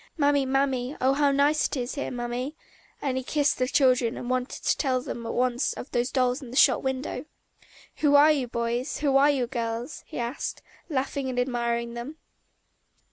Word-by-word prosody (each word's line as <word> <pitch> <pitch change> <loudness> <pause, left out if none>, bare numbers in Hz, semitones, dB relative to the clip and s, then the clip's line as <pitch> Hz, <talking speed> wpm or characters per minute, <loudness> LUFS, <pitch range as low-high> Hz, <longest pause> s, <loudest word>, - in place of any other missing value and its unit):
"Mammy, 285 -2 +3
Mammy; 270 0 0
oh, 260 +1 +3
how 285 0 +3
nice 285 +2 +3
it - - -4
is 245 0 -3
here, 285 - -3
Mammy!" 245 +4 -4 0.5
And 280 - 0
again - - -3
he 260 - -2
kissed 290 +1 +1
the 255 - +1
children 255 -3 +3
and 245 - -4
wanted 255 0 -2
to - - +2
tell 260 -3 0
them 235 -2 -6
at - - -3
once 250 +1 +1
of 265 - -9
those 245 +1 0
dolls 255 +1 +1
in 260 - -9
the 255 - -5
shop 260 -5 +5
window. 265 +3 -3 0.7
"Who 290 -1 +3
are 295 +2 +7
you, 275 -5 0
boys? 235 +4 -2
Who 280 -3 +2
are 280 +2 +6
you, 270 -4 +1
girls?" 235 +2 -4
he - - -8
asked, 240 +2 -4 0.3
laughing 270 -1 -2
and 250 - -4
admiring 235 -1 -1
them. 240 +6 -6
255 Hz, 195 wpm, -26 LUFS, 245-280 Hz, 0.7 s, are